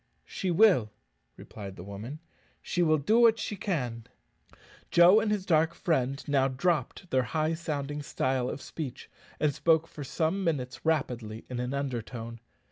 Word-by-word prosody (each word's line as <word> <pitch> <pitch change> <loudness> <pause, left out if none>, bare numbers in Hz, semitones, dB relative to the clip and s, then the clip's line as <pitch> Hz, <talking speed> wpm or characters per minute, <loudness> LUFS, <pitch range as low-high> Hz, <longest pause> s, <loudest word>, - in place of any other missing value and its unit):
"She 190 - -3
will," 175 - +5 0.5
replied 100 -3 -9
the 90 - -9
woman; 105 - -8 0.4
"she 175 - -2
will 155 -2 +4
do 210 +11 +3
what 230 -1 +6
she 210 - -4
can." 125 - -3 0.8
Joe 175 +5 +7
and 220 - 0
his 205 -3 -1
dark 160 -1 +2
friend 135 -6 0
now 135 -2 +3
dropped 170 +6 -1
their 130 - +3
high 155 +6 -1
sounding 150 -3 -3
style 130 -3 -1
of 140 - -6
speech, 145 -6 -7 0.3
and 150 -2 +2
spoke 160 +2 +2
for 150 - -8
some 160 +8 -1
minutes 130 -7 -2
rapidly 120 -8 -1
in 125 - -3
an 125 +2 -2
undertone. 115 -3 -4
145 Hz, 155 wpm, -29 LUFS, 125-170 Hz, 0.8 s, Joe